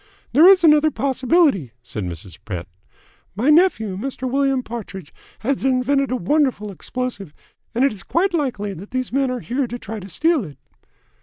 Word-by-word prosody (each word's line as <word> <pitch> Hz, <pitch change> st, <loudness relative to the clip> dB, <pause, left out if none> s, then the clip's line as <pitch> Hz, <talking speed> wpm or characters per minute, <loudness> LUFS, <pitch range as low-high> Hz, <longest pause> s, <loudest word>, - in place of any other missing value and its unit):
"There 310 Hz, +7 st, +7 dB
is 380 Hz, -2 st, +7 dB
another 305 Hz, -1 st, +6 dB
possibility," 265 Hz, -, +1 dB
said 105 Hz, -4 st, -5 dB
Mrs. 85 Hz, 0 st, -8 dB
Pett. 90 Hz, -5 st, -5 dB, 0.7 s
"My 245 Hz, +9 st, +2 dB
nephew, 295 Hz, -, +3 dB
Mr. 260 Hz, +2 st, -4 dB
William 270 Hz, 0 st, +1 dB
Partridge, 200 Hz, -9 st, -8 dB, 0.3 s
had 265 Hz, +3 st, -1 dB
invented 270 Hz, +1 st, +1 dB
a 255 Hz, -, 0 dB
wonderful 250 Hz, -, 0 dB
explosive, 205 Hz, -, -5 dB, 0.4 s
and 250 Hz, +3 st, +3 dB
it 275 Hz, -, +1 dB
is 200 Hz, -, -9 dB
quite 365 Hz, +3 st, 0 dB
likely 245 Hz, -, -2 dB
that 190 Hz, +3 st, -10 dB
these 255 Hz, -1 st, -3 dB
men 270 Hz, -1 st, +1 dB
are 250 Hz, -1 st, -3 dB
here 255 Hz, +2 st, -2 dB
to 240 Hz, -, -5 dB
try 220 Hz, -2 st, -7 dB
to 195 Hz, 0 st, -10 dB
steal 315 Hz, -, +1 dB
it." 150 Hz, -6 st, -10 dB
255 Hz, 170 wpm, -21 LUFS, 200-280 Hz, 0.7 s, There